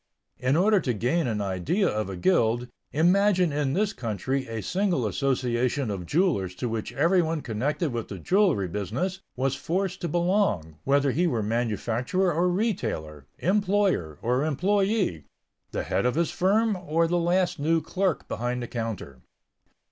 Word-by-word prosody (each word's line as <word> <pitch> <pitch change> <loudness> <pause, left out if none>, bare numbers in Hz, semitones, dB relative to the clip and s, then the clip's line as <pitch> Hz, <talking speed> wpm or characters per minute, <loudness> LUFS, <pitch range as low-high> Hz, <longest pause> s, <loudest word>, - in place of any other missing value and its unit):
In 130 +2 +1
order 200 +4 +4
to 130 -8 -1
gain 130 +8 0
an 110 -3 -1
idea 100 - 0
of 105 -2 -1
a 95 - -5
guild, 120 - +2 0.2
imagine 180 +2 +3
in 145 -2 0
this 210 +3 +1
country 130 +4 -2
a 115 -2 -5
single 180 - 0
association 125 +2 0
of 90 -4 -5
jewelers 140 - +1
to 120 - -3
which 115 -1 -3
everyone 165 +2 +2
connected 135 - -2
with 115 -2 -3
the 100 - -7
jewelry 175 - +2
business 110 - -3 0.2
was 135 +1 0
forced 190 +2 -2
to 175 - -1
belong, 170 - 0
whether 140 0 +3
he 175 +7 +1
were 115 -9 0
manufacturer 120 - 0
or 175 +3 +2
retailer, 110 - -2
employer, 190 - +1
or 125 +4 +1
employee, 190 - +1 0.4
the - - -3
head - - 0
of 125 - 0
his 170 0 +1
firm 210 +4 +2
or 165 -2 0
the 175 +1 +1
last 175 0 +1
new 165 +3 +2
clerk 180 +2 -1
behind 125 +1 -2
the - - -5
counter. 110 - -5
140 Hz, 155 wpm, -26 LUFS, 115-180 Hz, 0.4 s, order